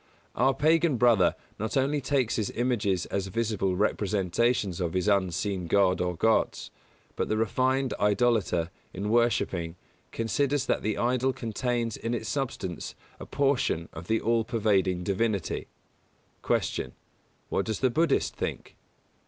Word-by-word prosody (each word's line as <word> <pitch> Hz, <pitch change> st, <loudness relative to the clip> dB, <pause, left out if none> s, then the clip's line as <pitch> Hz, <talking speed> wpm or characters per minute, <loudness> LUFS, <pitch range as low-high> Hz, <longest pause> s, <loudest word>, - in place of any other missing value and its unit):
Our 130 Hz, +3 st, +2 dB
Pagan 160 Hz, 0 st, +3 dB
brother 115 Hz, -7 st, +4 dB, 0.2 s
not 110 Hz, +6 st, -2 dB
only 140 Hz, +2 st, +1 dB
takes 130 Hz, -4 st, 0 dB
his 110 Hz, -3 st, -1 dB
images 105 Hz, -7 st, 0 dB
as 100 Hz, -1 st, -1 dB
visible 105 Hz, -2 st, -1 dB
representations 100 Hz, 0 st, 0 dB
of 85 Hz, -2 st, -1 dB
his 95 Hz, +1 st, 0 dB
unseen 95 Hz, -1 st, 0 dB
God 95 Hz, 0 st, +3 dB
or 90 Hz, -1 st, -1 dB
gods, 110 Hz, +6 st, +1 dB, 0.4 s
but -, -, -2 dB
the 110 Hz, -, +1 dB
refined 130 Hz, +4 st, +1 dB
idolater, 105 Hz, -5 st, +2 dB, 0.2 s
in 100 Hz, +3 st, -2 dB
worshipping, 95 Hz, -8 st, +1 dB, 0.4 s
considers 140 Hz, +5 st, 0 dB
that -, -, 0 dB
the 110 Hz, -1 st, -1 dB
idol 130 Hz, +2 st, +1 dB
contains 115 Hz, 0 st, -2 dB
in 115 Hz, +1 st, -2 dB
its 110 Hz, -1 st, -4 dB
substance 115 Hz, -10 st, -4 dB, 0.2 s
a -, -, -8 dB
portion 135 Hz, -, 0 dB
of 80 Hz, +2 st, -9 dB
the 110 Hz, 0 st, +2 dB
all 115 Hz, 0 st, +1 dB
pervading 100 Hz, -6 st, +1 dB
divinity. 100 Hz, 0 st, -1 dB, 0.7 s
182. -, -, 0 dB
Q. -, -, -13 dB, 0.6 s
_What 95 Hz, -, 0 dB
does 110 Hz, -1 st, -2 dB
the 130 Hz, -2 st, +3 dB
Buddhist 160 Hz, +2 st, +1 dB
think? -, -, -5 dB
110 Hz, 140 wpm, -28 LUFS, 95-125 Hz, 0.7 s, brother